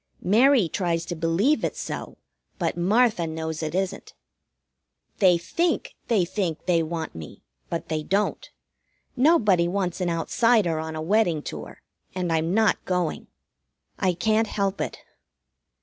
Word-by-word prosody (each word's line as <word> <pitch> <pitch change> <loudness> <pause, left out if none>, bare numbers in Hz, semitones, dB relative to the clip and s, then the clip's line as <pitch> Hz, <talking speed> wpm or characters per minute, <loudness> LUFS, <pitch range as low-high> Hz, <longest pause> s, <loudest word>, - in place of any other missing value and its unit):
Mary 230 +1 +4
tries 170 -1 -1
to 175 - -4
believe 170 - +1
it's - - -2
so, - - -6 0.4
but - - -1
Martha 200 0 +2
knows 160 0 -4
it 155 +1 -3
isn't. 190 0 -3 1.0
They 185 -3 +5
think 330 - -1
they 210 -7 +2
think 175 -3 -3
they 170 -2 +3
want 160 0 -4
me, 80 -2 -10 0.3
but 170 - -4
they 155 -1 -2
don't; 195 +6 -1 0.7
nobody 225 - +4
wants 185 -1 -2
an 180 - 0
outsider 175 +1 +2
on 160 0 -5
a 155 - -4
wedding 175 -4 +2
tour, - - -8 0.3
and 180 -3 -1
I'm 165 +1 0
not 220 +2 +2
going. 180 -3 -2 0.7
I 185 -2 +2
can't 220 +5 +1
help 200 -1 -1
it. - - -3
180 Hz, 140 wpm, -25 LUFS, 165-210 Hz, 1.0 s, They